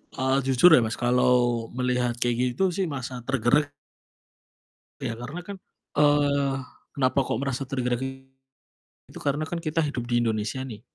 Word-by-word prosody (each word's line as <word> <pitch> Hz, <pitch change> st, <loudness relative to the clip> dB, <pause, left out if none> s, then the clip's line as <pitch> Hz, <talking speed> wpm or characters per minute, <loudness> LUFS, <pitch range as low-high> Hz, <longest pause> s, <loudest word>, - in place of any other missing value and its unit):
Eee, 130 Hz, 0 st, +1 dB
jujur 135 Hz, +7 st, +6 dB
ya 155 Hz, -, +8 dB
Mas, 110 Hz, -1 st, -1 dB
kalau 120 Hz, -1 st, +2 dB
melihat 125 Hz, -1 st, 0 dB
kayak 120 Hz, 0 st, 0 dB
gitu 190 Hz, +2 st, +2 dB
sih, 190 Hz, 0 st, -1 dB
merasa 130 Hz, -3 st, -5 dB
tergerak 135 Hz, +3 st, +2 dB, 1.3 s
ya, 115 Hz, -, -3 dB
karena 125 Hz, +9 st, -7 dB
kan, 200 Hz, -, -6 dB, 0.4 s
eee, 145 Hz, -2 st, +3 dB, 0.4 s
kenapa 130 Hz, -1 st, +1 dB
kok -, -, -2 dB
merasa 140 Hz, -1 st, -2 dB
tergerak? 125 Hz, -2 st, -1 dB, 1.1 s
Itu, -, -, -11 dB
karena 145 Hz, +2 st, -1 dB
kan 170 Hz, +2 st, -4 dB
kita 165 Hz, 0 st, -1 dB
hidup 125 Hz, -5 st, -4 dB
di 120 Hz, -1 st, +2 dB
Indonesia 110 Hz, +2 st, -2 dB
nih, 110 Hz, -5 st, -8 dB
130 Hz, 150 wpm, -26 LUFS, 120-145 Hz, 1.3 s, ya